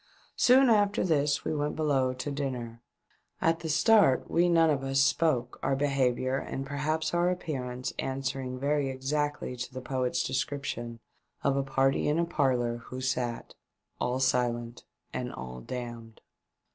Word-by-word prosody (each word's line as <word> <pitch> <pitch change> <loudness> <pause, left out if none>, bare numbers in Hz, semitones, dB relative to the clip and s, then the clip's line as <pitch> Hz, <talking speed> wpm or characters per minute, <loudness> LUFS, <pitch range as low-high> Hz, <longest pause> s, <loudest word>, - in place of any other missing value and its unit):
Soon 260 +2 +6
after 205 -2 +3
this 145 -4 +1
we - - 0
went 150 0 -1
below 140 -5 +1
to 130 +3 -5
dinner. 125 -5 -4 0.6
At 165 0 +2
the 160 - -5
start 175 - +4
we 175 +1 +3
none 165 -2 +5
of 135 -2 -1
us 135 0 +1
spoke, 135 -3 +2
our 135 - +1
behaviour 135 -2 +1
and 135 0 -4
perhaps 155 +3 -1
our 175 +1 +3
appearance 130 -8 -3
answering 130 -1 -3
very 140 +1 0
exactly 135 0 -2
to 125 0 -6
the 130 - -6
poet's 130 -1 -1
description 130 -3 -3 0.4
of 140 - +2
a 140 - +2
party 135 0 +1
in 150 +2 +2
a 170 - +2
parlour 125 -7 +1
who 125 +2 -8
sat 125 -2 -2 0.2
— - - -24
"All 125 +1 0
silent 120 -2 0 0.3
and - - -3
all 65 0 -8
damned!" 120 - -7
135 Hz, 155 wpm, -29 LUFS, 125-150 Hz, 0.6 s, Soon